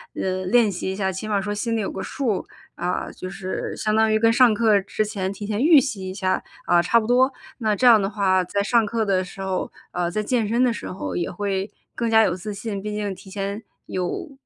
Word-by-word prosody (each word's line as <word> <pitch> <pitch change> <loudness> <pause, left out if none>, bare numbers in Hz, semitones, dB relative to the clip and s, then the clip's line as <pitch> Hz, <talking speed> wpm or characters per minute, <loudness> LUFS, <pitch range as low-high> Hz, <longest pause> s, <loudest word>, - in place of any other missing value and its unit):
嗯， 185 0 -2
练 235 -4 +4
习 180 +1 -4
一 190 - -4
下， 190 -1 -1
起 190 +4 -6
码 205 -2 +1
说 205 +1 -3
心 230 +2 -1
里 220 - 0
有 195 - -3
个 190 - -5
数。 235 -8 -2 0.3
啊， 175 +1 -2
就 185 - -7
是 190 -1 -4
相 215 0 0
当 220 0 +3
于 215 - +4
跟 225 +1 +4
上 240 -3 +5
课 215 -2 +4
之 215 +2 -2
前 195 -2 -3
提 205 +1 -7
前 210 +2 -2
预 310 -2 +8
习 195 -9 -3
一 185 - -6
下， 185 -1 0 0.2
啊， 175 -1 +4
差 230 +7 +3
不 215 - -4
多。 255 +3 +4 0.3
那 215 -2 +1
这 250 - 0
样 230 -3 +8
的 195 - 0
话， 190 -3 +2
在 200 +3 -1
上 230 +2 +3
课 225 0 -1
的 190 -2 +1
时 185 - -12
候， 190 -1 -2 0.2
呃， 175 -1 -1
在 215 +4 -2
健 230 -1 0
身 235 +3 +2
的 245 -2 +3
时 - - -6
候 185 - -5
也 175 - -1
会 195 +1 -2 0.2
更 235 -1 -1
加 220 0 +6
有 175 - +2
自 200 +3 -6
信， 200 -2 -4
毕 210 0 -4
竟 205 -2 -2
提 190 +1 -13
前 200 +2 -4 0.2
有 185 - -3
205 Hz, 265 characters per minute, -23 LUFS, 190-225 Hz, 0.3 s, 预